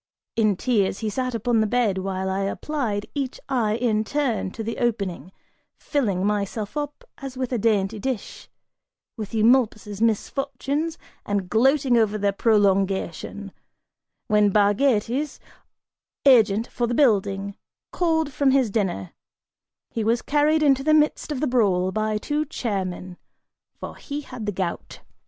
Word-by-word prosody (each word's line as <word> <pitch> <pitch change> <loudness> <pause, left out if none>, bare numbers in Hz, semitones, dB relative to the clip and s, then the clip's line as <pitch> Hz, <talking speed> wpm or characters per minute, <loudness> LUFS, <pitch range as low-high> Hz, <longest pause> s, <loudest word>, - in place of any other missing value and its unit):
In 215 -3 +3
tears, 205 -6 +1
he 215 -1 -2
sat 255 +1 -2
upon 230 0 +1
the 215 - +2
bed, 220 -4 +1
while 190 0 -3
I 190 0 -1
applied 210 0 -2
each 275 -3 -3
eye 220 -5 +1
in 225 -2 +1
turn, 255 -6 -1
to 220 +4 -7
the 230 +1 -4
opening, 200 -7 -2 0.5
filling 200 -10 -1
myself 210 +2 -2
up 290 -1 -4 0.2
as 270 -2 -7
with 255 -1 -3
a 240 - 0
dainty 210 -1 +1
dish, 255 -1 -5 0.7
with 220 0 -6
Eumolpus' 220 -3 +2
misfortunes, 275 +7 -1 0.3
and 200 -3 -2
gloating 260 +2 +3
over 215 -1 +1
their 205 -1 +1
prolongation, 195 -2 0 0.7
when 210 -1 +3
Bargates, 225 +6 +1 0.9
agent 225 -5 +5
for 240 -1 -2
the 240 - -1
building, 200 -6 +2 0.4
called 320 -4 0
from 280 0 +2
his 260 -5 +3
dinner, 185 - -2 0.8
was 230 +1 +1
carried 305 +2 +2
into 270 -2 +3
the 310 +1 +4
midst 305 0 +1
of 280 -3 -3
the - - +2
brawl 195 -7 +2
by 215 +1 -1
two 295 +7 -1
chair 220 -9 -2
men, 180 0 -7 0.6
for - - -8
he 290 0 -5
had 250 -6 -8
the - - +1
gout. 185 -3 -4
225 Hz, 140 wpm, -24 LUFS, 200-265 Hz, 0.9 s, agent